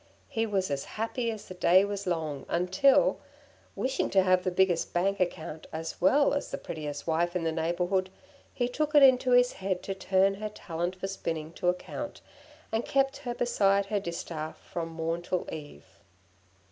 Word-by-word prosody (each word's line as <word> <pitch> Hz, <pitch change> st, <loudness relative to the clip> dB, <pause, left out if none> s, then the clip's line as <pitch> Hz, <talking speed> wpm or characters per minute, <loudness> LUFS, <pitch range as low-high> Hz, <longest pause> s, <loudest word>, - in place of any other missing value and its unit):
She 225 Hz, 0 st, +1 dB
was 190 Hz, -5 st, 0 dB
as 140 Hz, -1 st, -2 dB
happy 230 Hz, +2 st, -1 dB
as 220 Hz, -2 st, -6 dB
the -, -, -7 dB
day 185 Hz, +2 st, +5 dB
was 200 Hz, -1 st, -4 dB
long 155 Hz, -5 st, -2 dB
until, 190 Hz, +10 st, +3 dB, 0.6 s
wishing 265 Hz, +1 st, -1 dB
to 190 Hz, -1 st, +4 dB
have 185 Hz, -1 st, +3 dB
the -, -, +1 dB
biggest 180 Hz, -1 st, +1 dB
bank 195 Hz, +3 st, +1 dB
account 160 Hz, -3 st, -3 dB
as 160 Hz, +2 st, -6 dB
well 280 Hz, +10 st, +4 dB
as 285 Hz, -, -2 dB
the -, -, -4 dB
prettiest 150 Hz, -2 st, -6 dB
wife 170 Hz, +2 st, 0 dB
in 180 Hz, -, 0 dB
the 165 Hz, -, +1 dB
neighbourhood, 175 Hz, +3 st, 0 dB, 0.4 s
he 245 Hz, -, -1 dB
took 300 Hz, +4 st, -2 dB
it 290 Hz, -, +8 dB
into 260 Hz, -1 st, +6 dB
his 245 Hz, 0 st, +5 dB
head 190 Hz, -1 st, -3 dB
to 195 Hz, -, -3 dB
turn 190 Hz, 0 st, +2 dB
her 210 Hz, +2 st, -5 dB
talent 175 Hz, -3 st, -4 dB
for 190 Hz, -, -5 dB
spinning 165 Hz, -4 st, -4 dB
to 180 Hz, 0 st, 0 dB
account, 180 Hz, 0 st, -4 dB, 0.5 s
and 225 Hz, +1 st, 0 dB
kept 270 Hz, 0 st, +1 dB
her 245 Hz, -4 st, -5 dB
beside 200 Hz, -5 st, +2 dB
her 205 Hz, +1 st, -1 dB
distaff 170 Hz, -3 st, -5 dB
from 165 Hz, -1 st, -5 dB
morn 165 Hz, +1 st, -2 dB
till 180 Hz, +1 st, -2 dB
eve. 150 Hz, -2 st, -9 dB
185 Hz, 180 wpm, -29 LUFS, 170-215 Hz, 0.6 s, it